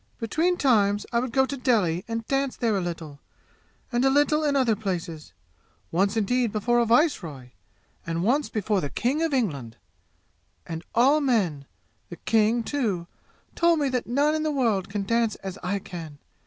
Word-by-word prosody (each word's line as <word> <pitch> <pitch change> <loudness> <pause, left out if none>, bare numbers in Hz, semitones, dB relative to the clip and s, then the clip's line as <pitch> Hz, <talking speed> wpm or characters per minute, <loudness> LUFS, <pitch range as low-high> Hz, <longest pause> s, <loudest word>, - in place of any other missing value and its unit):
"Between 320 +10 0
times 205 -7 +2
I 235 - +3
would 250 0 -3
go 265 +2 +3
to 280 - -4
Delhi 205 -10 +1
and 230 -1 -4
dance 275 0 -1
there 225 -3 0
a 195 - 0
little, 165 -5 -6 0.7
and 240 0 +1
a 270 - +5
little 290 +2 +3
in 290 -2 +1
other 250 -5 +3
places 175 -6 -5 0.6
once 195 +5 +1
indeed 235 +2 +1
before 240 +3 +1
a 235 - +2
viceroy, 170 - +1 0.5
and 165 +1 -2
once 270 +8 +1
for 210 -3 0
the 145 - -3
king 270 - -1
of 325 -1 0
England 145 - -2 0.9
and 165 0 -6
all 275 +6 +4
men 185 - 0 0.4
the 175 - -7
king, 225 +5 +1
too! 220 -11 -2 0.5
told 340 -1 +3
me 285 -3 +1
that 250 -2 -2
none 285 +5 +2
in 310 - -1
the 310 - 0
world 230 -10 0
can 200 0 -2
dance 230 0 +1
as 190 0 -8
I 185 +3 -1
can! 165 -6 -8
225 Hz, 175 wpm, -25 LUFS, 185-265 Hz, 0.9 s, a